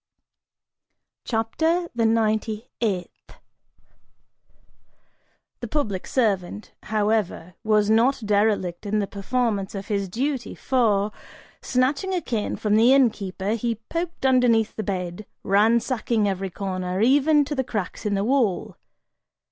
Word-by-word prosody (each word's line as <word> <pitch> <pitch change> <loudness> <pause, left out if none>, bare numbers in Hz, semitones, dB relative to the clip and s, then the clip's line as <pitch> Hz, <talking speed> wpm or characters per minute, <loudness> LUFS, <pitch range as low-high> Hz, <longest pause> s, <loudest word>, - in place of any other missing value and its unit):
CHAPTER 320 +10 0
THE 230 -1 +2
NINETY 220 0 0
EIGHTH. 190 -6 -3 2.3
The 240 - -5
public 215 -8 -2
servant, 210 -4 -1
however, 210 -5 -1
was 215 -2 +3
not 235 +3 +3
derelict 205 -3 +1
in 210 +1 0
the 205 - +1
performance 205 0 -2
of 195 0 -6
his 200 -2 -1
duty 260 +5 -2
for, 215 -6 +1 0.5
snatching 280 +9 0
a 355 - -1
cane 230 -8 -2
from 210 0 +1
the 235 +3 +6
innkeeper, 205 -6 +1
he 230 +1 -1 0.2
poked 335 -3 -3
underneath 245 -4 +3
the - - -3
bed, 185 -1 -4 0.2
ransacking 220 +2 +2
every 195 0 -2
corner, 185 -1 -3
even 290 +5 +4
to 295 - -4
the 265 -2 0
cracks 210 -7 -4
in 210 -1 0
the 195 - 0
wall. 240 -7 0
220 Hz, 120 wpm, -24 LUFS, 200-250 Hz, 2.3 s, the